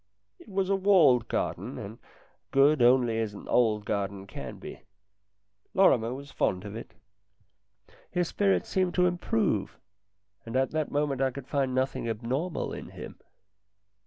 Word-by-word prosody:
It - - -16
was 195 -1 0
a - - +4
walled 165 - +4
garden 110 +5 -3
and 110 -1 -8 0.5
good 140 +1 +4
as 120 - +7
only 120 -3 +3
an 105 -2 -4
old 110 -4 +2
garden 100 -1 -3
can 100 - -8
be. - - -10 0.9
Lorrimer 120 -12 +4
was 140 +2 -8
fond 90 +2 -1
of 100 +1 -7
it. 115 - -9 1.1
His 175 -1 0
spirits 200 +2 +1
seemed 185 -2 0
to 180 - +4
improve, 180 - 0 0.7
and 115 +2 -7
at 130 0 +1
the 155 -1 -1
moment 145 -2 -1
I 135 - +3
could 130 0 -8
find 135 -3 0
nothing 130 -2 -1
abnormal 125 +10 -2
in - - -7
him. - - -10
130 Hz, 150 wpm, -28 LUFS, 115-170 Hz, 1.1 s, as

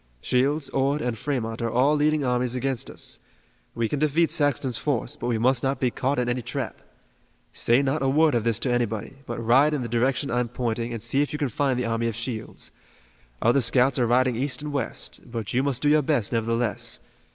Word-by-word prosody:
Shields, 140 - +1
Ord 135 +2 +1
and 120 -2 -1
Fremont 115 -3 -3
are 115 - 0
all 130 +6 +3
leading 150 0 +2
armies 125 -1 0
against 130 0 -1
us. - - -8 0.6
We 115 -1 0
can 145 - -2
defeat 155 +2 +2
Saxton's 135 -5 +1
force, 120 -1 -1
but 120 - -5
we 120 -2 +1
must 125 +2 +2
not 135 +1 0
be 125 -2 +1
caught 135 +4 -1
in 125 -1 0
any 120 +1 -1
trap. 120 +1 -4 0.7
Say 120 +4 +3
not 135 +3 0
a 135 - +2
word 155 +2 +4
of 120 -3 +1
this 115 -1 +1
to 130 - 0
anybody, 120 +1 -2
but 120 - -4
ride 130 +7 +4
in 135 - -2
the - - -3
direction 125 +4 0
I'm 120 0 +1
pointing 120 -1 -2
and 115 -2 -4
see 135 +4 +2
if 145 - -1
you - - -1
can 145 -3 -1
find 130 +2 0
the 125 - -1
army 115 0 0
of 115 - -2
Shields. 115 -1 -4 0.7
Other 120 +4 +4
scouts 125 +2 +3
are 120 - +2
riding 125 +1 +3
east 130 +3 -1
and 150 -1 -4
west, 135 -5 -4
but 115 -3 -4
you 125 - +3
must 135 -2 -1
do 145 - +4
your 150 0 +5
best, 135 -7 0
nevertheless. 115 0 0
125 Hz, 220 wpm, -25 LUFS, 115-140 Hz, 0.7 s, your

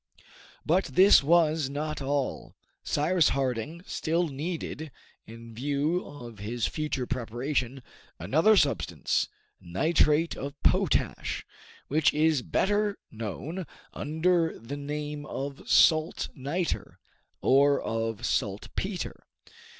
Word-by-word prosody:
But 180 +5 +3
this 190 +2 +6
was 155 -1 +3
not 150 +1 -3
all. 140 0 -2 0.3
Cyrus 165 +2 +2
Harding 135 +6 -2
still 165 +1 0
needed, 155 +1 -4 0.4
in 115 +1 -11
view 145 +8 0
of 120 -7 -10
his 115 +3 -2
future 150 -4 -2
preparation, 125 +2 -2 0.3
another 160 - +4
substance, 90 - +1 0.3
nitrate 150 - +2
of 140 +1 -6
potash, - - +1 0.4
which 150 +1 +2
is 155 -2 +3
better 205 +7 +1
known 140 - -5 0.3
under 165 +2 +1
the 115 +6 -7
name 150 +1 -4
of 140 +1 -6
salt 160 +1 +4
niter, 155 +6 -3 0.4
or 140 +1 +4
of 115 -1 -3
saltpeter. 130 - -3
145 Hz, 100 wpm, -28 LUFS, 125-160 Hz, 0.4 s, this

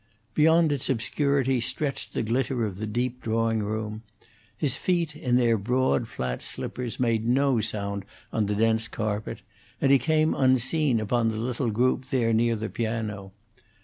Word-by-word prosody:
Beyond 160 +1 +4
its 140 -3 -1
obscurity 135 +1 +1
stretched 135 +3 -3
the - - 0
glitter 120 +1 0
of 100 -3 -5
the 110 +2 -4
deep 125 +3 -2
drawing 115 0 0
room. 110 +1 -3 0.6
His 145 -5 +1
feet, 170 -4 0
in 125 -4 0
their 115 -3 +3
broad, 125 +2 +1
flat 65 - -4
slippers, 125 -2 -5
made 115 -2 +1
no 130 -1 +3
sound 100 -2 -2 0.3
on 110 -2 +1
the 105 - -1
dense 110 +1 +2
carpet, 110 -1 -4 0.4
and 135 - +3
he 140 - +6
came 155 +1 +2
unseen 130 0 +3
upon 115 +2 +1
the 110 - -3
little 120 +2 -1
group 125 +4 +1
there 120 -3 +1
near 115 +1 +2
the 110 0 -3
piano. 110 -4 -3
115 Hz, 160 wpm, -26 LUFS, 110-130 Hz, 0.6 s, he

